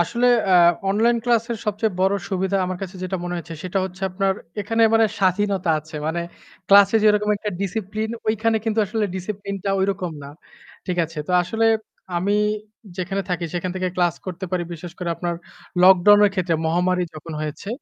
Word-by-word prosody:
আসলে 235 +8 +1 0.2
আ - - +4 0.4
অনলাইন 230 +4 +3
ক্লাসের 235 -1 +1
সবচেয়ে 210 0 0
বড় 190 +1 +3 0.2
সুবিধা 190 +1 0
আমার 185 -1 -4
কাছে 190 0 -6
যেটা 185 +1 -2
মনে 175 0 -3
হয়েছে, 170 -1 -7
সেটা 185 +2 -1
হচ্ছে 190 +1 -8
আপনার 195 +1 +1 0.3
এখানে 225 +3 0
মানে 225 -1 +5
স্বাধীনতা 190 -2 +1
আছে। 155 +1 -10
মানে 170 +2 -1 0.5
ক্লাসে 200 +2 +7
যেরকম 210 0 +3
একটা 210 +1 -4
discipline 215 +3 -3 0.2
ঐখানে 225 +1 +1
কিন্তু 225 -1 -1
আসলে 215 +1 -1
discipline 200 +1 -5
টা 195 - 0
ঐরকম 190 -3 -1
না। 140 - -8 0.6
ঠিক 180 - -2
আছে? 160 -1 -9
তো - - -1
আসলে 225 +6 -1 0.5
আমি 190 +4 0 0.6
যেখানে 195 +1 -2
থাকি, 175 -1 -2
সেখান 180 +1 -2
থেকে 185 0 -1
ক্লাস 175 -3 +2
করতে 185 0 -5
পারি। 180 -2 0
বিশেষ 170 +1 -8
করে 180 - -3
আপনার 175 -1 -2 0.5
lockdown 190 +2 +7
এর 205 - +4
ক্ষেত্রে, 175 -3 0
মহামারী 180 +2 +1
যখন 160 +1 -8
হয়েছে, 155 +6 -5
190 Hz, 175 wpm, -22 LUFS, 180-210 Hz, 0.6 s, ক্লাসে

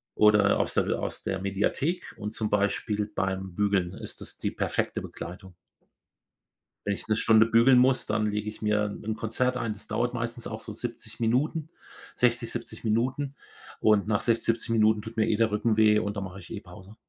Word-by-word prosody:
oder 105 -1 +5
aus - - 0
der - - +1
aus - - -5
der 95 - -2
Mediathek 105 - -1
und 105 +1 -5
zum 110 -2 -2
Beispiel 105 +1 0
beim 95 -1 -2
Bügeln 100 -3 +1
ist - - -8
das - - -8
die - - -2
perfekte - - -1
Begleitung. 90 +2 -9 1.3
Wenn 100 - +2
ich - - -9
'ne 110 - +2
Stunde 110 0 +5
bügeln 115 +3 +5
muss, 130 +1 +3
dann 105 0 0
lege 105 0 -3
ich 105 - -11
mir 105 -1 +2 0.2
'n 110 0 -3
Konzert 125 +3 0
ein, 115 -3 -2
das 105 - -13
dauert 120 0 -1
meistens 115 0 -4
auch - - -6
so - - -7
70 - - -6
Minuten 145 +7 0 0.5
60, 120 -1 +1
70 120 0 -6
Minuten 130 +6 0 0.5
und 105 -2 +4
nach 105 -2 +1
60, 115 -1 +1
70 115 0 0
Minuten 110 -1 +3
tut 110 +2 -9
mir 110 0 +3
eh 110 - +2
der 110 0 +2
Rücken 105 +1 +1
weh 105 -1 +5
und 105 -1 -3
dann 100 - -3
mache 95 0 -8
ich - - -13
eh 110 -3 -6
Pause. 95 +2 -13
110 Hz, 195 wpm, -27 LUFS, 105-115 Hz, 1.3 s, oder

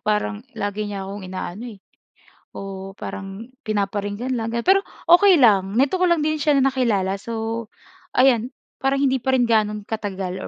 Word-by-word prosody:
parang 210 0 -1 0.2
lagi 205 0 -3
niya 200 -1 -5
akong 200 +2 -7
inaano, 185 +3 -6
eh - - -26 0.7
oo, 195 -1 -7
parang 195 +3 -7 0.2
pinaparinggan 205 +3 -2
lang. 225 -1 -2
Pero 375 +13 +3 0.2
okay 355 +1 +7
lang, 200 -6 +4
nito 275 +6 +3
ko 365 - 0
lang 340 -2 +3
din 310 +1 +1
siya 300 0 +1
na 270 - +4
nakilala. 220 -8 +1
So, 225 +2 -4 0.4
ayan 250 -2 +3 0.3
parang 270 +1 +2
hindi 265 -2 +1
pa 265 - -2
rin 245 - +3
gaano 210 -2 +1
katagal, 195 -4 -4
220 Hz, 160 wpm, -22 LUFS, 200-260 Hz, 0.7 s, okay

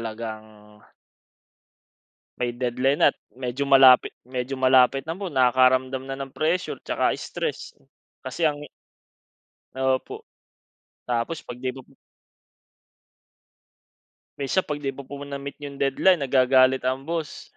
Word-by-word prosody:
talagang 110 -2 -8 1.6
May 120 -1 -2
deadline 125 +3 0
at - - -3 0.2
medyo 130 +2 -3
malapit 135 -2 +6
medyo 125 +1 -4
malapit 130 0 +4
na 165 +3 -4
po, 200 - -4
nakakaramdam 130 0 +3
na 135 - -4
ng 135 - -5
pressure 165 +6 -1
'tsaka - - 0
stress, 470 - -5 0.5
kasi 165 - -1
ang 145 -1 -2 1.1
Opo. 130 0 -2 0.8
Tapos 125 +7 -2
'pag 120 - -9
'di 130 0 -2
mo 130 - -10 2.6
Minsan 145 +7 0
'pag 150 -1 -3
'di 135 -2 -4
mo 140 - -9
po 140 +1 -9
na-meet 140 0 -7
'yung 140 -1 -8
deadline, 150 +5 +3
nagagalit 130 0 +4
ang 130 +1 -1
boss. 160 0 -5
130 Hz, 115 wpm, -24 LUFS, 125-140 Hz, 2.6 s, malapit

